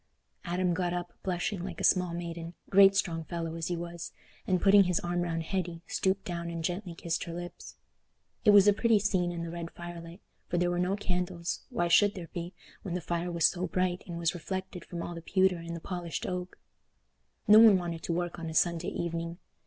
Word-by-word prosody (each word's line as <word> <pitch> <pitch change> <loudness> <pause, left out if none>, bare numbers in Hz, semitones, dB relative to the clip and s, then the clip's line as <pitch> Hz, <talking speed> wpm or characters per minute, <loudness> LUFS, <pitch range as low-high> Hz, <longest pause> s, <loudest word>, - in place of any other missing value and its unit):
Adam 180 0 0
got 175 0 -1
up, 175 0 -5
blushing 185 +1 -2
like 190 - -6
a - - -4
small 180 -2 +3
maiden—great 175 +3 +2
strong 165 -4 0
fellow 165 0 -4
as 165 -1 -3
he 175 - -2
was—and, 170 +2 -5
putting 200 0 +6
his 180 -1 +1
arm 175 0 -1
round 165 -1 -2
Hetty 175 -1 -3
stooped 195 +1 0
down 170 -1 -4
and 165 -1 -4
gently 175 +1 -3
kissed 165 0 -2
her 170 - -6
lips. 175 0 -8 0.7
It - - +5
was 205 -1 +8
a 205 - +7
pretty 230 +1 +3
scene 190 -4 +1
in 170 -1 -4
the 165 - -5
red 170 -1 -5
fire 175 0 -8
light; 170 +3 -11 0.3
for 175 - -1
there 175 0 +2
were 175 - -1
no 180 +2 +1
candles—why 180 +2 -2
should 205 +4 +5
there 170 -4 -7
be, 175 0 -5 0.3
when 180 -3 -4
the - - 0
fire 175 +1 -2
was 170 -2 +2
so 180 0 +2
bright 180 +1 -1
and 170 -1 -5
was 170 -1 0
reflected 185 +1 -5
from 170 -1 -5
all 175 - -5
the 170 - -7
pewter 190 +1 +2
and 170 0 -6
the - - -5
polished 175 -1 -4
oak? 180 0 -4 0.9
No 210 +1 +9
one 220 -4 +8
wanted 170 -2 -4
to - - -3
work 175 0 -2
on 165 -1 -4
a 160 - -7
Sunday 170 +1 +2
evening. 170 0 -3
175 Hz, 210 wpm, -30 LUFS, 170-185 Hz, 0.9 s, No